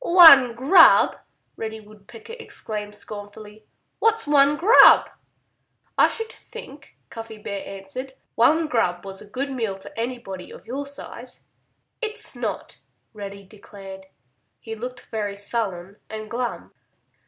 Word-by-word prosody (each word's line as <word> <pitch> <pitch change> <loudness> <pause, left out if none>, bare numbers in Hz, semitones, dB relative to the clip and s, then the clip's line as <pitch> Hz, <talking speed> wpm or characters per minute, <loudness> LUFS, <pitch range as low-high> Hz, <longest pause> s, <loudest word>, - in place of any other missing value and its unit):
"One 320 - +8
grub!" 315 +8 +6 0.4
Reddy 220 0 -6
Woodpecker 215 - -14
exclaimed 210 - -7
scornfully. 210 +1 -10 0.3
"What's 450 0 +2
one 290 0 +4
grub?" 425 +10 +7 0.8
"I - - +5
should 450 -1 -5
think," 275 +1 -13
Cuffy 225 -1 -8
Bear 200 -2 -6
answered, 200 +8 -8 0.2
"one 315 +8 +3
grub 180 -9 -1
was 195 0 -8
a 210 - -14
good 275 +6 -4
meal 225 -7 -3
for 195 - -12
anybody 230 -6 -5
of - - -13
your 275 +4 -5
size." 280 - -10 0.6
"It's 440 -2 -5
not," - - -5 0.3
Reddy 200 -1 -8
declared. 195 -1 -12 0.5
He 225 - -8
looked 250 +3 -7
very 205 -2 -4
sullen 200 -3 -4
and 215 0 -7
glum. 245 0 -4
225 Hz, 125 wpm, -23 LUFS, 205-275 Hz, 0.8 s, One